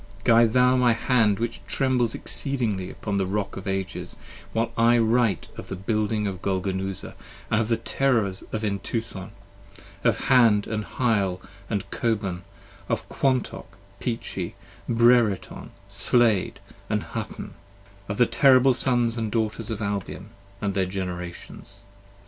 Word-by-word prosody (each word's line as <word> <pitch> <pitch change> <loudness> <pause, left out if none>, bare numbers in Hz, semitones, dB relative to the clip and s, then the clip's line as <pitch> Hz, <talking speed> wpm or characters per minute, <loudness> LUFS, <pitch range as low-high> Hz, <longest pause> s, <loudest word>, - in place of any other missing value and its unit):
Guide 115 -1 +5
thou 125 0 +5
my 125 -2 +4
hand 115 -3 +2
which 115 0 -3
trembles 125 -4 +1
exceedingly 115 -10 -1
upon 100 -2 -4
the 95 -1 0
rock 100 0 -2
of 95 - -7
ages, 95 0 -3 0.4
While 115 +1 -1
I 115 +1 +4
write 115 -6 +2
of - - -8
the - - -5
building 105 +2 -1
of 95 -2 -4
Golgonooza, 95 0 -2 0.4
and 115 0 +3
of 110 - -1
the 115 0 +1
terrors 115 -9 0
of 110 0 -3
Entuthon: 100 -1 -3 0.7
25 - - -21
Of 115 -4 +4
Hand 115 -6 +5 0.2
& - - -6
Hyle 100 -7 +1 0.3
& - - -9 0.2
Coban, 100 -6 -1 0.5
of - - -1
Kwantok, 130 -7 -1 0.2
Peachey, 115 -2 -4 0.3
Brereton, 115 -3 +2 0.2
Slayd 115 -6 +2 0.3
& - - -27
Hutton: - - -4 0.6
Of 100 - -3
the 120 - +5
terrible 130 0 +5
sons 120 -2 +1
& 110 - -2
daughters 110 0 -2
of 110 -1 -3
Albion, 100 0 -4 0.3
and 100 -1 -1
their 95 -1 0
Generations. 90 -2 -7
110 Hz, 135 wpm, -25 LUFS, 100-120 Hz, 0.7 s, Guide